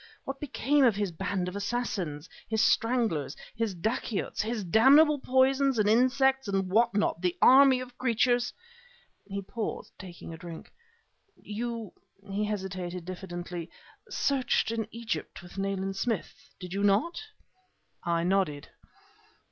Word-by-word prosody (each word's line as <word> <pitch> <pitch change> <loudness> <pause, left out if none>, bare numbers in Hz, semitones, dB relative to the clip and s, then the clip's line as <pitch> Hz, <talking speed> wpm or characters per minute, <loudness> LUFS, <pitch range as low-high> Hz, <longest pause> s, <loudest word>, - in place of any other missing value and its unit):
What 270 0 -5
became 290 0 +1
of 235 -5 +5
his 200 -2 -1
band 190 +2 -2
of 180 - -5
assassins 200 -8 -3 0.2
his 220 0 +2
stranglers, 225 - +1 0.2
his 225 -4 -1
dacoits, 215 +3 -2
his 220 0 -2
damnable 280 - +6
poisons 265 0 +3
and 210 -1 +3
insects 265 +3 +3
and 195 -2 -1
what 230 +1 +3
not 205 -5 +1
the 180 -1 0
army 265 0 +7
of 250 -1 -9
creatures 245 0 +2 0.4
" 485 0 -32
He 200 0 -3
paused, 220 +3 -5
taking 175 -3 -9
a - - -8
drink. 170 -2 -10 0.6
"You 230 -1 -5
" 200 +1 -26
he 205 +2 0
hesitated 185 -4 -4
diffidently 175 -2 -6 0.4
"searched 260 -4 +1
in 225 -2 -2
Egypt 230 -4 -5
with 175 +2 -9
Nayland 195 0 -2
Smith, 225 -2 -3
did 180 0 -7
you 200 - -1
not?" 205 - +2 0.8
I 170 -1 0
nodded. 175 -6 0
210 Hz, 140 wpm, -29 LUFS, 185-245 Hz, 0.8 s, army